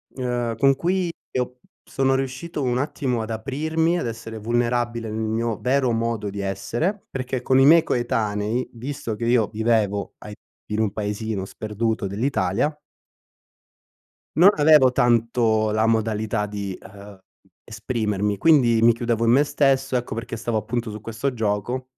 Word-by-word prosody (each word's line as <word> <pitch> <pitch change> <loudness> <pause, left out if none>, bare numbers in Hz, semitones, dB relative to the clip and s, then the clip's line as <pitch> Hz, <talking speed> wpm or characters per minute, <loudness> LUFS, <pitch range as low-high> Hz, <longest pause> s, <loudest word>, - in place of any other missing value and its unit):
ehm, 120 -3 -2
con 135 +3 +4
cui 180 +4 0 0.2
io 125 0 -3 0.2
sono 135 0 0
riuscito 135 +4 -4
un 125 -1 0
attimo 130 -3 -1
ad 110 - -6
aprirmi, 155 +9 -1
ad 145 - -2
essere 115 -1 -7
vulnerabile 120 0 -1
nel 110 +1 -4
mio 115 0 -1
vero 130 0 +1
modo 115 -2 -1
di 100 +1 -6
essere, 115 - -2
perché 130 -1 -3
con 130 +1 +3
i 135 - +6
miei 165 +3 +7
coetanei, 115 -2 -1
visto 120 -2 -5
che 115 - -4
io 115 -3 +3
vivevo 110 -2 0
ai 105 - -9 0.4
in 105 - -1
un 110 -2 +1
paesino 105 -1 -3
sperduto 110 +1 -3
dell'Italia 105 +4 0 1.6
non 180 +5 +8
avevo 150 -4 +6
tanto 115 -3 +2
la 110 +1 +2
modalità 110 -1 0
di, 100 -2 -5
ehm, 100 +1 -13 0.5
esprimermi, 105 -3 -2
quindi 120 -4 +4
mi 115 +1 +7
chiudevo 115 0 -1
in 115 - +4
me 135 +4 +5
stesso, 135 -2 +1
ecco 125 -1 -2
perché 115 +1 -5
stavo 115 0 -2
appunto 115 +1 -3
su 105 - -7
questo 115 +5 -3
gioco 110 +3 -2
115 Hz, 150 wpm, -23 LUFS, 110-130 Hz, 1.6 s, non